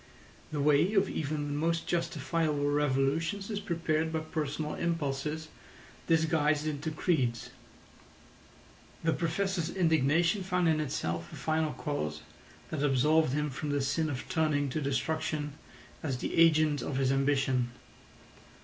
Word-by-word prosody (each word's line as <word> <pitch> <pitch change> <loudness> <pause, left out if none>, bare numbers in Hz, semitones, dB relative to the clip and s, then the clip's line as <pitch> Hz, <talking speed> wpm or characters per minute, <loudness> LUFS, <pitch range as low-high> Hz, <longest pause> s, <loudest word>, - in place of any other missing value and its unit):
The 150 - -2
way 150 +8 +3
of 195 0 +4
even 150 -2 -2
the 145 - -3
most 165 +3 0
justifiable 165 -3 0
revolutions 150 +8 0
is 205 - -1
prepared 165 -4 -1
by 160 -1 -1
personal 155 -1 -3
impulses 155 -1 -2 0.6
disguised 160 -2 +2
into 150 0 -2
creeds. 135 - 0 1.5
The 165 0 +2
Professor's 175 +1 -1
indignation 165 +2 +2
found 180 -2 +1
in 160 -1 +3
itself 85 - -3
a - - -8
final 155 -1 0
cause 75 - -3 0.5
that 155 - -2
absolved 145 +1 +3
him 150 0 0
from 145 +3 -4
the 145 0 +1
sin 155 +4 0
of 130 -3 -5
turning 150 -3 +1
to 155 +4 -2
destruction 150 +2 -1 0.5
as 135 -5 -2
the - - -3
agent 155 -3 +4
of 135 - -3
his 135 -1 +2
ambition. 135 -2 +1
155 Hz, 130 wpm, -30 LUFS, 140-165 Hz, 1.5 s, of